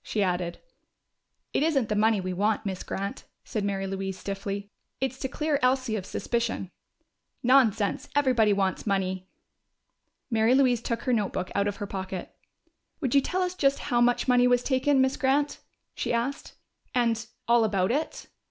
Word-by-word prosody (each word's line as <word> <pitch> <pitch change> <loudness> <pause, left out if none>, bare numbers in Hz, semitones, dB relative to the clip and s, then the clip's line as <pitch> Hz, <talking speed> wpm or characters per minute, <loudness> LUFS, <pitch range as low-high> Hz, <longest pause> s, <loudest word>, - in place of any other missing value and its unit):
she 210 - 0
added. 180 -2 -1 1.0
"It - - +1
isn't 290 -7 +2
the 210 - -1
money 215 0 +3
we 185 0 -3
want, 210 +4 0
Miss 190 -2 -3
Grant," 200 +1 -4 0.2
said 215 - -3
Mary 195 -1 -1
Louise 190 0 -4
stiffly. 200 +1 -5 0.3
"It's 265 0 -2
to 265 - -2
clear 300 +1 -1
Elsie 255 -2 +2
of 195 -3 -4
suspicion." 235 -5 -2 0.7
"Nonsense! 240 -5 +3
Everybody 250 -7 +4
wants 195 0 0
money!" 185 -2 -1 1.0
Mary 225 +2 +4
Louise 255 -4 +3
took 230 -1 -3
her 255 - +1
notebook 200 -4 -1
out 200 0 +1
of 205 - -2
her 205 - -5
pocket. 190 -2 -5 0.7
"Would 265 -7 -1
you 280 - +6
tell 370 +6 -1
us 360 0 -2
just 280 -6 +2
how 240 -4 0
much 245 +2 +2
money 250 0 +5
was 245 0 +3
taken, 270 +1 +2
Miss 265 0 +1
Grant?" 285 +2 +1 0.3
she - - -2
asked. 240 +4 -2 0.4
"And 230 -2 +2 0.2
all 235 0 +5
about 200 -2 +1
it?" 300 +5 -2
230 Hz, 165 wpm, -27 LUFS, 200-260 Hz, 1.0 s, you